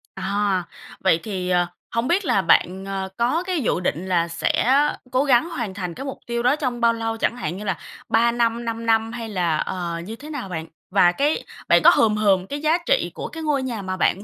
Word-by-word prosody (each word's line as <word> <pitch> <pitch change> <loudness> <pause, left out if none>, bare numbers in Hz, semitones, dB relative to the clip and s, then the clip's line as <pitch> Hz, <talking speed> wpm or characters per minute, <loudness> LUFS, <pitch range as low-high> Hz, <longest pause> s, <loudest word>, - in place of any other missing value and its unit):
À, 195 -1 0 0.4
vậy 180 -4 +3
thì, 185 -4 -3
ờ, 175 -1 +3 0.3
hông 230 +2 -1
biết 370 +4 +1
là 195 - +2
bạn, 185 +2 +2
ờ, 195 -1 -3
có 255 +9 +1
cái 365 -4 -1
dự 215 - 0
định 180 -1 -2
là 170 -2 +2
sẽ 170 +8 +1 0.4
cố 255 +2 +2
gắng 270 +3 +3
hoàn 230 - -4
thành 180 -3 -4
cái 270 - -7
mục 270 - -5
tiêu 235 0 -2
đó 255 +3 +4
trong 250 -5 -3
bao 230 0 +4
lâu, 225 0 -3
chẳng 240 - 0
hạn 185 -6 -4
như 210 - -7
là 190 -5 -1 0.3
3 235 +2 +4
năm, 235 0 0
5 230 0 -4
năm 225 0 +2
hay 230 -2 -6
là, 175 -6 0
ờ, 175 -2 -3
như 220 +4 -6
thế 295 +5 -11
nào 280 -10 -5
bạn? 165 -2 -5 0.2
Và 185 -2 +5
cái 285 - 0 0.2
bạn - - +5
có - - +10
hừm 215 -2 +4
hừm 195 -3 +2
cái 285 +5 -5
giá 310 +2 +3
trị - - +1
của - - -5
cái 325 -1 -7
ngôi 290 -3 +1
nhà 235 -5 -3
mà 185 0 -4
bạn 195 +2 +1
225 Hz, 235 wpm, -22 LUFS, 185-250 Hz, 0.4 s, có